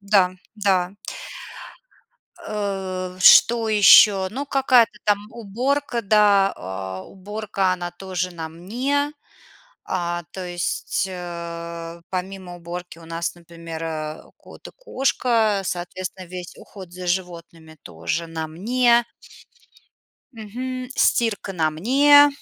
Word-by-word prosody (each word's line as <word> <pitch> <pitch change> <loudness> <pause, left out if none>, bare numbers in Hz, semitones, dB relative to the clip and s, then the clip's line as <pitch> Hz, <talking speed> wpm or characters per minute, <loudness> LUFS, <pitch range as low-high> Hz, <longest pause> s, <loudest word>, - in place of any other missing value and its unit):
Да-да. 195 -1 +1 1.5
Э, 190 -3 -3
что 230 +4 +7
ещё? 205 -2 +7
Ну, 275 +5 -4
какая-то 255 -6 +3
там 205 -1 +3
уборка, 240 +4 -2
да. 200 -1 +4
А, 95 0 -6
уборка, 200 -1 -2
она 175 -1 -4
тоже 185 0 -4
на 160 -1 -5
мне. 255 - -2 0.8
А, 175 -1 -2
то 185 -1 -6
есть, 175 +2 -2
э, 170 -1 -7
помимо 185 -1 -5
уборки 175 0 -8
у 165 - -13
нас, 165 +1 -3
например, 165 -1 -9
э, 155 -1 -5
кот - - -14
и - - -11
кошка. 240 - +1
Соответственно, 180 +1 -5
весь 180 -1 -8
уход 190 -4 -12
за 180 0 -7
животными 170 -3 -4
тоже 85 - -4
на 160 -1 -4
мне. 235 +7 +2 1.3
Мгм. 250 +3 -6
Стирка 220 -4 +1
на 160 -3 +1
мне. 285 - +6
185 Hz, 105 wpm, -22 LUFS, 170-220 Hz, 1.5 s, что